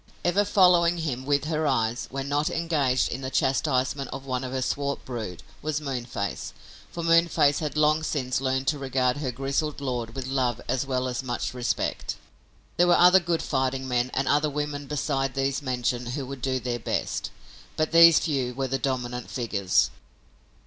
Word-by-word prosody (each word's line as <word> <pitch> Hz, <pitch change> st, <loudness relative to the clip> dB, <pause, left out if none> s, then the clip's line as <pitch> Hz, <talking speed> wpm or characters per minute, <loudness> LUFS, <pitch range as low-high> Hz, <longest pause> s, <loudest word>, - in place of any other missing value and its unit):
Ever 180 Hz, +4 st, +3 dB
following 175 Hz, -3 st, +4 dB
him 135 Hz, -5 st, -3 dB
with 145 Hz, 0 st, +2 dB
her 155 Hz, -1 st, 0 dB
eyes, 120 Hz, -3 st, 0 dB
when 135 Hz, +1 st, -4 dB
not 145 Hz, +2 st, +1 dB
engaged 145 Hz, -7 st, +1 dB
in 135 Hz, -, -4 dB
the 130 Hz, -, -3 dB
chastisement 135 Hz, 0 st, 0 dB
of 135 Hz, 0 st, -7 dB
one 130 Hz, -1 st, -2 dB
of 130 Hz, -, -5 dB
her 130 Hz, 0 st, -1 dB
swart 140 Hz, +2 st, -2 dB
brood, 110 Hz, -9 st, -6 dB, 0.2 s
was 155 Hz, -1 st, -1 dB
Moonface, 120 Hz, -8 st, -4 dB, 0.4 s
for 170 Hz, -, -5 dB
Moonface 165 Hz, -3 st, +4 dB
had 150 Hz, -2 st, -3 dB
long 155 Hz, +1 st, +3 dB
since 130 Hz, -5 st, -1 dB
learned 130 Hz, 0 st, 0 dB
to 150 Hz, -, -2 dB
regard 130 Hz, -1 st, 0 dB
her 140 Hz, -3 st, -2 dB
grizzled 135 Hz, +4 st, -2 dB
lord 120 Hz, -4 st, -3 dB
with 135 Hz, -1 st, -4 dB
love 130 Hz, -3 st, 0 dB
as 130 Hz, +1 st, -1 dB
well 130 Hz, -1 st, -1 dB
as 125 Hz, 0 st, -2 dB
much 125 Hz, -1 st, -3 dB
respect. 125 Hz, -1 st, -2 dB, 0.6 s
There 175 Hz, -, +5 dB
were 175 Hz, -, +5 dB
other 180 Hz, +2 st, +7 dB
good 170 Hz, -2 st, -1 dB
fighting 130 Hz, -1 st, -1 dB
men 125 Hz, 0 st, 0 dB
and 135 Hz, +1 st, 0 dB
other 150 Hz, +1 st, +3 dB
women 145 Hz, -1 st, -4 dB
beside 135 Hz, -2 st, -1 dB
these 135 Hz, 0 st, 0 dB
mentioned 125 Hz, -2 st, -2 dB
who 135 Hz, +2 st, -3 dB
would 135 Hz, 0 st, -8 dB
do 130 Hz, +1 st, 0 dB
their 120 Hz, 0 st, -3 dB
best, -, -, -2 dB, 0.5 s
but 155 Hz, 0 st, 0 dB
these 165 Hz, 0 st, +8 dB
few 130 Hz, -6 st, -1 dB
were 135 Hz, 0 st, -1 dB
the 135 Hz, +1 st, -1 dB
dominant 125 Hz, -2 st, -3 dB
figures. 105 Hz, -7 st, +1 dB
135 Hz, 180 wpm, -26 LUFS, 125-150 Hz, 0.6 s, these